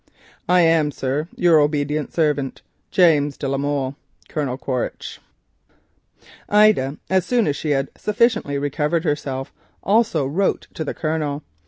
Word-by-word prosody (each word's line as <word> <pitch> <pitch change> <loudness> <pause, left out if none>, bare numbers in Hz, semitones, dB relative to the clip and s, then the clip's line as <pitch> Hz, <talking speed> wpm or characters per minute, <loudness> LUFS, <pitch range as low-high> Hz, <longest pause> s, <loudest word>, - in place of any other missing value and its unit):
"I 180 0 +5
am, 165 -2 +3
sir, 140 +2 -2
your 170 -3 +4
obedient 150 0 0
servant, 150 -4 -1 0.3
"James 150 -6 +3
de 140 - -3
la 135 0 -1
Molle. 140 -1 -2 0.3
"Colonel 140 -5 -2
Quaritch, 130 -2 -4 1.0
V.C." - - -27 0.2
Ida 205 -10 +4
as 190 -1 +3
soon 235 +4 +1
as 145 - 0
she 155 - -4
had 135 -1 0
sufficiently 215 - +1
recovered 150 +3 -1
herself 140 -4 -3 0.3
also 200 - +2
wrote 175 +9 0
to 160 - -4
the 150 - -4
Colonel. 155 -2 -2
150 Hz, 140 wpm, -21 LUFS, 140-170 Hz, 1.0 s, I